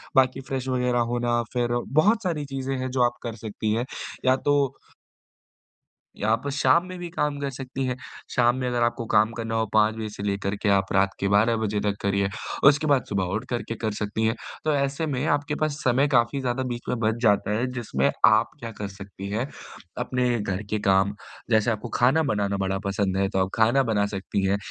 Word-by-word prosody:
बाकी 130 Hz, 0 st, +3 dB
फ्रेश 130 Hz, -1 st, -4 dB
वग़ैरह 125 Hz, -1 st, +1 dB
होना 120 Hz, -1 st, +1 dB
फिर 120 Hz, -1 st, 0 dB, 0.3 s
बहुत 215 Hz, +7 st, +3 dB
सारी 165 Hz, -6 st, -1 dB
चीज़ें 135 Hz, -1 st, -3 dB
हैं 130 Hz, 0 st, -2 dB
जो 130 Hz, -1 st, 0 dB
आप 120 Hz, 0 st, -1 dB
कर 115 Hz, -2 st, -4 dB
सकती 110 Hz, 0 st, -3 dB
हैं। 115 Hz, +3 st, 0 dB, 0.4 s
या 130 Hz, 0 st, +5 dB
तो 145 Hz, +2 st, +1 dB, 1.6 s
या 105 Hz, -, 0 dB
आप 115 Hz, +5 st, 0 dB
शाम 140 Hz, +5 st, +3 dB
में 185 Hz, 0 st, -7 dB
भी 175 Hz, -1 st, -5 dB
काम 150 Hz, -4 st, -1 dB
कर 140 Hz, -1 st, -2 dB
सकती 135 Hz, 0 st, -5 dB
हैं। 125 Hz, -1 st, -2 dB, 0.4 s
शाम 120 Hz, -1 st, +4 dB
में 130 Hz, -1 st, -2 dB
अगर 120 Hz, -1 st, 0 dB
आपको 120 Hz, 0 st, 0 dB
काम 110 Hz, +2 st, +5 dB
करना 115 Hz, -1 st, -3 dB
हो 110 Hz, 0 st, +1 dB
5 110 Hz, 0 st, +4 dB
बजे 110 Hz, -1 st, -4 dB
से 100 Hz, -1 st, -8 dB
लेकर 100 Hz, 0 st, -1 dB
के 105 Hz, -, +3 dB
आप 100 Hz, -1 st, +2 dB
रात 95 Hz, 0 st, +3 dB
के 100 Hz, -, 0 dB
12 105 Hz, +4 st, +4 dB
बजे 105 Hz, -2 st, -1 dB
तक 100 Hz, -1 st, 0 dB
करिए, 100 Hz, 0 st, +1 dB, 0.4 s
उसके 150 Hz, +2 st, +4 dB
बाद 140 Hz, -3 st, +3 dB
सुबह 100 Hz, -2 st, 0 dB
उठ 115 Hz, +4 st, -3 dB
करके 120 Hz, -1 st, -3 dB
कर 110 Hz, -1 st, -2 dB
सकती 105 Hz, +1 st, -2 dB
हैं। 110 Hz, +1 st, +1 dB, 0.3 s
तो 155 Hz, -, +2 dB
ऐसे 140 Hz, +3 st, 0 dB
में 140 Hz, -2 st, -1 dB
आपके 145 Hz, 0 st, 0 dB
पास 155 Hz, -1 st, -1 dB
समय 130 Hz, +2 st, +3 dB
काफ़ी 120 Hz, -1 st, +2 dB
ज़्यादा 130 Hz, 0 st, -1 dB
बीच 120 Hz, -, -6 dB
में 125 Hz, -, -1 dB
बच 110 Hz, -1 st, +1 dB
जाता 105 Hz, -2 st, +3 dB
है, 120 Hz, -, 0 dB
जिसमें 120 Hz, -3 st, 0 dB, 0.2 s
आप 110 Hz, +2 st, +5 dB
क्या 115 Hz, -1 st, -6 dB
कर 105 Hz, -2 st, -5 dB
सकती 100 Hz, 0 st, -9 dB
हैं, 110 Hz, +6 st, -1 dB, 0.5 s
अपने 125 Hz, -2 st, 0 dB
घर 95 Hz, -1 st, -3 dB
के 105 Hz, -, 0 dB
काम, 95 Hz, +1 st, +3 dB, 0.3 s
जैसे 110 Hz, 0 st, +3 dB
आपको 110 Hz, +2 st, -4 dB
खाना 135 Hz, +7 st, +3 dB
बनाना 100 Hz, -8 st, 0 dB
बड़ा 95 Hz, 0 st, -1 dB
पसंद 100 Hz, -1 st, 0 dB
है, 95 Hz, 0 st, +2 dB
तो 95 Hz, -, -1 dB
आप -, -, -8 dB
खाना 115 Hz, +5 st, +4 dB
बना 110 Hz, -4 st, +1 dB
सकती 100 Hz, 0 st, -3 dB
हैं। 100 Hz, +1 st, +2 dB
120 Hz, 215 wpm, -25 LUFS, 105-130 Hz, 1.6 s, या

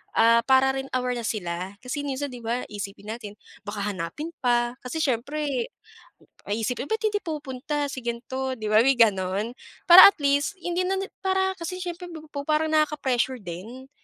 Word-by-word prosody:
Ah, 230 Hz, +1 st, +6 dB
para 265 Hz, 0 st, +5 dB
rin 270 Hz, -, -5 dB
aware 250 Hz, -1 st, -1 dB
na 230 Hz, -, -5 dB
sila, 180 Hz, -1 st, -4 dB
kasi 285 Hz, +3 st, -4 dB
minsan 275 Hz, 0 st, -3 dB
di 245 Hz, -, -8 dB
ba, 235 Hz, +2 st, -2 dB
iisipin 205 Hz, +1 st, -6 dB
natin 210 Hz, -3 st, -7 dB, 0.3 s
baka 205 Hz, -1 st, -4 dB
hanapin 190 Hz, -, -5 dB
pa, 240 Hz, 0 st, +1 dB
kasi 315 Hz, +6 st, -3 dB
siyempre 270 Hz, 0 st, -1 dB, 0.8 s
ay 210 Hz, +2 st, -2 dB
iisipin, 250 Hz, +3 st, -2 dB
"Ba't 440 Hz, 0 st, -1 dB
hindi 425 Hz, -1 st, +1 dB
pumupunta 290 Hz, -2 st, -3 dB
si 260 Hz, -1 st, -6 dB
ganito?" 260 Hz, +3 st, -3 dB
di 215 Hz, -1 st, -4 dB
ba, 215 Hz, +1 st, +6 dB
may 270 Hz, -, +5 dB
gano'n? 200 Hz, -1 st, +2 dB, 0.4 s
Para 350 Hz, +2 st, +12 dB
at -, -, -39 dB
least 285 Hz, +8 st, +1 dB
hindi 355 Hz, +2 st, -1 dB
na 380 Hz, -, 0 dB
ni 390 Hz, +1 st, -4 dB, 0.2 s
para 380 Hz, 0 st, +1 dB
kasi 365 Hz, +2 st, -5 dB
siyempre 355 Hz, 0 st, -5 dB
pa 320 Hz, -2 st, -8 dB
pupu 285 Hz, -2 st, -7 dB
parang 310 Hz, 0 st, +1 dB
nakaka-pressure 265 Hz, -5 st, +1 dB
din, 220 Hz, +10 st, -9 dB
260 Hz, 180 wpm, -25 LUFS, 230-305 Hz, 0.8 s, Para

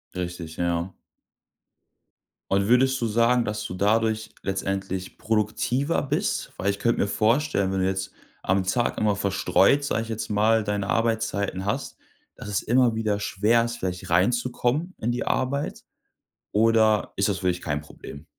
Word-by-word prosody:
Richtig, 90 Hz, -3 st, -5 dB
ja. 85 Hz, +1 st, -1 dB, 1.6 s
Und 100 Hz, 0 st, +2 dB
würdest 130 Hz, +2 st, +3 dB
du 115 Hz, -, +1 dB
sagen, 115 Hz, +2 st, +3 dB
dass 105 Hz, 0 st, -3 dB
du 90 Hz, -, -5 dB
dadurch 110 Hz, +3 st, +1 dB
letztendlich 95 Hz, -1 st, -3 dB
produktiver 115 Hz, +7 st, 0 dB
bist? 160 Hz, +11 st, -1 dB
Weil 100 Hz, -, 0 dB
ich 100 Hz, -, -1 dB
könnte 120 Hz, -, +1 dB
mir -, -, +1 dB
vorstellen, 110 Hz, -1 st, +1 dB
wenn 95 Hz, -, -1 dB
du 95 Hz, -, +2 dB
jetzt 95 Hz, 0 st, -2 dB, 0.3 s
am 95 Hz, 0 st, +1 dB
Tag 120 Hz, +6 st, 0 dB
immer 105 Hz, -2 st, +2 dB
verstreut, 100 Hz, +6 st, +2 dB
sage 115 Hz, -5 st, -1 dB
ich 115 Hz, -, -10 dB
jetzt 110 Hz, -1 st, -4 dB
mal, 110 Hz, +1 st, +3 dB
deine 100 Hz, -1 st, -2 dB
Arbeitszeiten 110 Hz, -4 st, 0 dB
hast, 100 Hz, -, -3 dB, 0.4 s
dass -, -, -9 dB
es 105 Hz, -1 st, -1 dB
immer 120 Hz, 0 st, +3 dB
wieder 110 Hz, -2 st, -1 dB
schwer 105 Hz, +4 st, +2 dB
ist, 120 Hz, 0 st, -4 dB
vielleicht 90 Hz, -3 st, -4 dB
reinzukommen 120 Hz, -, +1 dB
in 120 Hz, +2 st, -1 dB
die 120 Hz, -, -2 dB
Arbeit. 140 Hz, +3 st, -1 dB, 0.7 s
Oder 110 Hz, -1 st, +3 dB
ist 100 Hz, +1 st, +1 dB
das 95 Hz, -1 st, -1 dB
für 95 Hz, -, -1 dB
dich 90 Hz, 0 st, -2 dB
kein 75 Hz, -2 st, -2 dB
Problem? 75 Hz, 0 st, -11 dB
105 Hz, 160 wpm, -25 LUFS, 95-115 Hz, 1.6 s, würdest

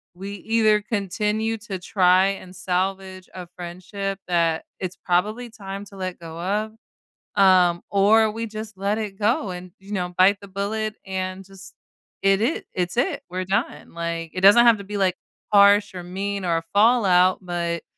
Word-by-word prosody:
we 195 Hz, +2 st, -7 dB
either 215 Hz, 0 st, +2 dB
continue 210 Hz, +2 st, -1 dB
to 205 Hz, -4 st, -6 dB
try 185 Hz, 0 st, +3 dB
and 185 Hz, -1 st, -7 dB
salvage 190 Hz, +1 st, -3 dB
a 180 Hz, -2 st, -7 dB
friendship 185 Hz, +3 st, -5 dB
that 165 Hz, -2 st, +1 dB
it's 185 Hz, -1 st, -5 dB
probably 210 Hz, +7 st, 0 dB
time 200 Hz, -3 st, -7 dB
to 200 Hz, -, -15 dB
let 185 Hz, -1 st, -4 dB
go 165 Hz, 0 st, -9 dB
of, 210 Hz, +4 st, -2 dB, 0.7 s
um, 180 Hz, -2 st, +5 dB
or 215 Hz, +2 st, +4 dB
we 225 Hz, +1 st, -4 dB
just 215 Hz, -1 st, -8 dB
let 200 Hz, +2 st, -1 dB
it 200 Hz, -3 st, -5 dB
go 210 Hz, -2 st, +1 dB
and, 180 Hz, 0 st, -8 dB
you 200 Hz, +2 st, -10 dB
know, 180 Hz, -2 st, -2 dB
bite 195 Hz, +2 st, +5 dB
the 200 Hz, -, -11 dB
bullet 215 Hz, +2 st, -3 dB
and 190 Hz, 0 st, -4 dB
just 195 Hz, 0 st, -12 dB, 0.5 s
it 195 Hz, +1 st, +3 dB
it 265 Hz, +9 st, -1 dB
it's 180 Hz, +3 st, -2 dB
it, 280 Hz, +1 st, 0 dB
we're 185 Hz, +1 st, -3 dB
done, 190 Hz, -2 st, -2 dB
like, 170 Hz, -1 st, -4 dB
it 185 Hz, -, -4 dB
doesn't 205 Hz, +5 st, +7 dB
have 230 Hz, -3 st, +5 dB
to -, -, -7 dB
be, 205 Hz, 0 st, -5 dB
like, 185 Hz, -2 st, +1 dB, 0.4 s
harsh 200 Hz, -1 st, +5 dB
or 180 Hz, -, -6 dB
mean, 195 Hz, +2 st, -4 dB
or 165 Hz, -1 st, +1 dB
a 165 Hz, -, -3 dB
fallout, 200 Hz, -5 st, +4 dB
but 170 Hz, -2 st, -3 dB
195 Hz, 175 wpm, -23 LUFS, 180-210 Hz, 0.7 s, doesn't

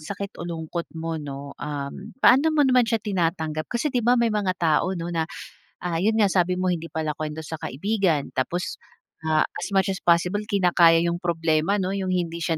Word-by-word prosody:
sakit 200 Hz, +5 st, -6 dB
o 175 Hz, -, -5 dB
lungkot 165 Hz, +1 st, -4 dB
mo 160 Hz, -1 st, -3 dB
'no, 140 Hz, -1 st, -7 dB
um, 145 Hz, +6 st, -5 dB, 0.2 s
paano 275 Hz, +6 st, +6 dB
mo 295 Hz, -, +5 dB
naman 250 Hz, -3 st, +4 dB
siya 225 Hz, -, +2 dB
tinatanggap. 165 Hz, -5 st, -1 dB
Kasi, 255 Hz, +4 st, -1 dB
'di 245 Hz, -, +2 dB
ba, 240 Hz, +2 st, +3 dB
may 235 Hz, -2 st, +2 dB
mga 195 Hz, -3 st, 0 dB
tao 170 Hz, +3 st, +1 dB
'no 170 Hz, 0 st, -4 dB
na, 165 Hz, 0 st, -1 dB, 0.6 s
ah, 170 Hz, -1 st, -1 dB
yun 220 Hz, +2 st, +2 dB
nga, 215 Hz, -, +5 dB
sabi 180 Hz, -1 st, +1 dB
mo 185 Hz, -1 st, +1 dB
hindi 165 Hz, 0 st, -5 dB
palakwento 155 Hz, 0 st, -3 dB
sa 160 Hz, -, -5 dB
kaibigan. 180 Hz, -, -1 dB
Tapos, 175 Hz, +7 st, -2 dB, 0.4 s
ah, 155 Hz, -1 st, +2 dB
as -, -, -4 dB
much 195 Hz, 0 st, +2 dB
as -, -, -7 dB
possible, 180 Hz, +4 st, +2 dB
kinakaya 175 Hz, -4 st, +5 dB
yung 170 Hz, 0 st, -1 dB
problema 165 Hz, +2 st, +1 dB
'no, 190 Hz, -1 st, -1 dB
yung 190 Hz, -1 st, -2 dB
hindi 170 Hz, -2 st, -2 dB
siya 165 Hz, -1 st, 0 dB
175 Hz, 195 wpm, -24 LUFS, 160-200 Hz, 0.6 s, paano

